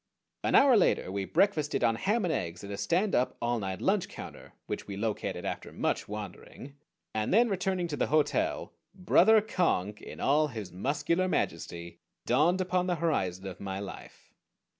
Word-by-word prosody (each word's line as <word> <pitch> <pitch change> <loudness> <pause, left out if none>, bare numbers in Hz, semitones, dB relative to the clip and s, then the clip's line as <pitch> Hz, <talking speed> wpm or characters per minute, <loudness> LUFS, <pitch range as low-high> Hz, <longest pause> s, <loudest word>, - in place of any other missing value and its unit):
An - - +2
hour 270 -3 +7
later 185 - +2
we 100 0 -2
breakfasted 155 - +1
on 115 -1 +4
ham 205 - 0
and 165 - 0
eggs 85 - -4
at 100 - -7
a 100 - -4
stand 185 - +1
up 125 - +1
all 120 0 0
night 95 -2 -4
lunch - - +1
counter - - -10
which - - -5
we 100 -1 -6
located 110 0 -3
after - - -4
much - - -1
wandering, 105 +6 -8 0.4
and 110 0 -1
then, 235 +4 +5
returning 190 -2 -1
to 145 - -3
the - - +1
hotel, 155 0 0 0.2
Brother 215 +4 +5
Conk 105 - 0
in - - -10
all 150 +3 +3
his 110 -8 -7
muscular 145 - 0
majesty 85 - -3 0.3
dawned 175 +5 +3
upon 180 0 0
the 180 - +1
horizon 95 - -1
of 95 -2 -7
my 95 -1 -4
life. 100 -1 -10
145 Hz, 175 wpm, -29 LUFS, -, 0.4 s, hour